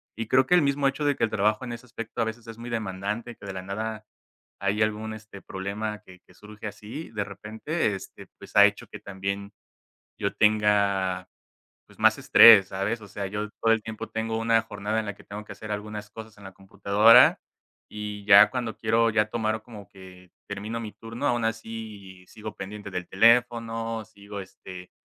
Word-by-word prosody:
y 115 0 -4
creo 130 +2 +4
que 180 - +1
el 175 - +6
mismo 140 0 +1
hecho 145 +2 -2
de 145 -1 +2
que - - -3
el 110 - +1
trabajo 105 +3 +1
en 120 - -6
ese 120 +2 -10
aspecto 115 0 -6
a - - +2
veces 110 +1 -6
es 115 0 -10
muy 120 - -7
demandante, 110 +1 -4
que 100 - -12
de 95 - -5
la 95 - -6
nada 110 +3 -5 0.5
hay 100 +3 0
algún, 110 +1 -1
este, 110 -2 -11
problema, 105 +3 -5
que 90 -2 -16
que - - -21
surge 105 +1 -12
así 105 - -8
de 105 -2 -2
repente, 110 +4 -3
este, - - -10
pues - - -14
ha - - +9
hecho - - -1
que - - -10
también 100 +1 -5 0.7
yo - - -2
tenga 100 -4 +2 0.6
pues - - -21
más - - +4
estrés, 105 -4 +8
¿sabes? 100 +4 -2
O 105 - -12
sea, 100 +1 -5
yo 105 +2 -4
todo 115 - +4
el 110 -1 +1
tiempo 110 0 -7
tengo 110 0 -2
una 115 0 +3
jornada 105 +1 -3
en 110 - -6
la 105 - -4
que - - -18
tengo 105 +1 -8
que - - -8
hacer 110 -1 -7
algunas 105 0 -6
cosas 110 -1 -11
en 100 - -15
la 95 - -9
computadora 100 +3 +5 0.5
y 105 -1 -6
ya 100 +1 +8
cuando 120 -4 -3
quiero 115 +1 +2
ya 105 -1 +1
tomar 110 -1 -1
como 105 -4 -12
que 90 -1 -15 0.2
termino 105 +3 -5
mi 110 -2 -7
turno, 115 +5 -6
aún 120 -3 +1
así 110 -5 -7
sigo 110 -1 -9
pendiente 100 +1 -7
del 90 -1 -5
teléfono, 115 0 +2
sigo, 100 -1 -11
este, 90 -1 -11
105 Hz, 200 wpm, -26 LUFS, 100-115 Hz, 0.7 s, ha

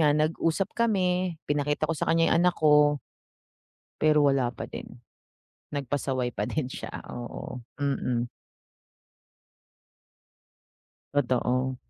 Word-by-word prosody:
nga 150 -1 +4
nag-usap 165 +5 +1
kami 185 -6 +1
pinakita 145 +1 0
ko 165 - 0
sa 160 - -2
kanya 165 0 +4
yung - - +5
anak 180 0 +4
ko, 150 -1 +5 1.0
pero 150 -1 +4
wala 130 -3 +1
pa - - -7
din. 120 - -9 0.7
Nagpasaway 135 -3 -1
pa - - -2
din 145 -5 -2
siya, - - -7 0.2
oo, 120 +1 -6 0.2
mm. 125 -4 0 2.8
Totoo. 130 -1 +1
145 Hz, 105 wpm, -27 LUFS, 130-165 Hz, 2.8 s, yung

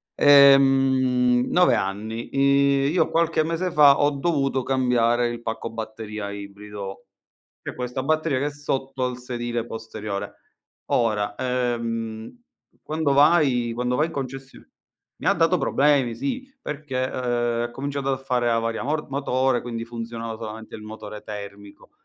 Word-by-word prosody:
Ehm, 135 -3 +5
9 180 0 +4
anni. 110 +4 -3
I 140 0 +3
io 165 -1 +2
qualche 165 -1 +2
mese 165 +3 -2
fa 145 -3 +6
ho 145 0 +3
dovuto 140 -3 0
cambiare 120 -2 +2
il 120 0 -6
pacco 115 0 -4
batteria 110 -2 -6
ibrido, 100 0 -8 0.6
che - - -6
questa 125 +1 -4
batteria 155 -2 +1
che 140 - -1
è - - -2
sotto 135 -2 -3
al 125 -1 -3
sedile 120 -2 -4
posteriore. 110 -3 -6 0.6
Ora, 105 -3 +1
ehm, 115 - -3 0.5
quando 155 -2 0
vai 140 -5 +4
quando 125 +1 -1
vai 155 +4 +2
in - - -10
concessio 135 -1 -7 0.5
mi - - -4
ha - - +5
dato 165 +2 +2
problemi, 135 -4 +2
sì, 245 - -4
perché, 150 - -4
ehm, 120 -2 -1
ha 120 - -4
cominciato 140 +1 -3
a 135 - 0
fare 125 -2 0
avaria 115 -1 0
mor 150 +3 -2
motore, 130 -2 0
quindi 115 -1 -5
funzionava 115 -1 -6
solamente 110 0 -8
il 110 - -10
motore 105 -1 -9
termico. 100 -1 -10
125 Hz, 140 wpm, -24 LUFS, 115-140 Hz, 0.6 s, fa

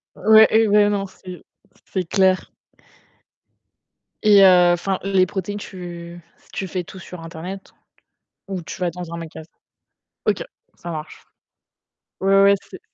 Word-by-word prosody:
Ouais 220 +2 +7
et 220 0 +4
beh 205 0 +4
non 200 -1 -1
c'est 185 -1 -12 0.4
c'est 185 -2 -3
clair. 190 -1 +1 1.7
Et 205 -2 +7
heu, 180 -2 +6
enfin, 185 +2 -2
les 195 -1 +3
protéines, 190 +2 -5
tu 175 -3 -9 0.3
tu 190 - -4
fais 180 0 -3
tout - - -12
sur 180 -1 -10
internet 175 +4 -8 0.7
ou 190 -2 -4
tu 170 - -9
vas 175 -1 0
dans 175 -1 -8
un - - -5
magasin? 160 -1 -9 0.8
OK, - - 0 0.3
ça 170 - -8
marche. 155 -1 -8 1.0
Ouais, 195 +1 +4
ouais, 200 0 +6 0.2
c'est 185 - -10
185 Hz, 140 wpm, -21 LUFS, 175-195 Hz, 1.7 s, Ouais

